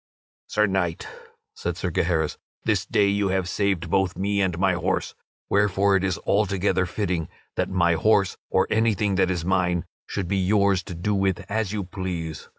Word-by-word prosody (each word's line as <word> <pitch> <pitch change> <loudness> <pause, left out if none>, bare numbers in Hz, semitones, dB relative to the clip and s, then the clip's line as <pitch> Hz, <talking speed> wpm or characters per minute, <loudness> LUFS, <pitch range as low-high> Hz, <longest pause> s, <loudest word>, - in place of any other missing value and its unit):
"Sir 105 0 +2
Knight," 95 -4 -1 0.5
said 85 -1 -4
Sir 90 -1 -2
Gaheris, 80 -1 0 0.2
"this - - 0
day 100 - +3
you 100 0 +1
have 95 -1 0
saved 90 -3 -1
both 95 -2 +1
me 100 +2 0
and 90 -3 0
my 95 0 +2
horse, 90 - -1 0.3
wherefore 100 0 +3
it 95 - +1
is 95 -4 0
altogether 95 -2 +1
fitting 90 -3 -2 0.3
that - - 0
my 85 -2 +3
horse 100 +2 +2
or - - +3
anything 110 -2 +2
that 95 -1 +2
is 90 -3 -2
mine 90 -1 +1 0.2
should 95 -4 -3
be 100 +2 0
yours 100 0 +3
to 90 - -7
do 95 +5 -1
with 95 -1 0
as 110 -2 0
you 105 -2 -2
please. 90 -4 -5
95 Hz, 175 wpm, -24 LUFS, 90-100 Hz, 0.5 s, day